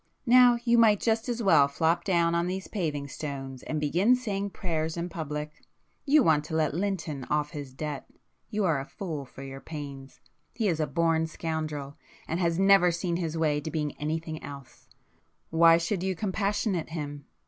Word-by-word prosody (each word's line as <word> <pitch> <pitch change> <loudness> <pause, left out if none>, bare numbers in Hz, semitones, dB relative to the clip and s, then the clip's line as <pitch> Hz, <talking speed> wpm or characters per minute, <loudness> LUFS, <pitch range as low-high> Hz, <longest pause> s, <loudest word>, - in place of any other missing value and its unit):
Now 245 0 +7
you 235 -1 +4
might 215 -3 +5
just 225 +1 0
as 240 -1 -2
well 160 -8 +6
flop 165 +4 +1
down 170 -3 +2
on 170 +1 +1
these 190 +1 -4
paving 150 -8 -3
stones 135 -3 -6
and 155 - -3
begin 175 - +3
saying 200 -5 -3
prayers 160 -4 -3
in 170 +1 -3
public. 150 -2 -5 0.5
You 290 0 +6
want 150 -5 +3
to 160 - -4
let 155 -3 +1
Lynton 170 -6 -2
off 150 0 -1
his 145 -4 -7
debt,—you 150 +8 -6
are 160 -6 +2
a 135 - -6
fool 160 -8 -5
for 135 +1 -11
your 135 0 -8
pains. 140 -3 -8 0.4
He 225 -3 0
is 165 -4 0
a 155 - +1
born 165 -1 +1
scoundrel,—and 155 0 -5
has 170 -2 +1
never 195 -2 +6
seen 170 0 -2
his 165 -2 -3
way 150 -2 +1
to 160 - -5
being 150 -2 -2
anything 155 +1 -3
else,—why 165 +4 -1
should 170 +3 -1
you 190 0 -1
compassionate 195 -2 -1
him? 145 -3 -6
165 Hz, 170 wpm, -28 LUFS, 150-190 Hz, 0.5 s, Now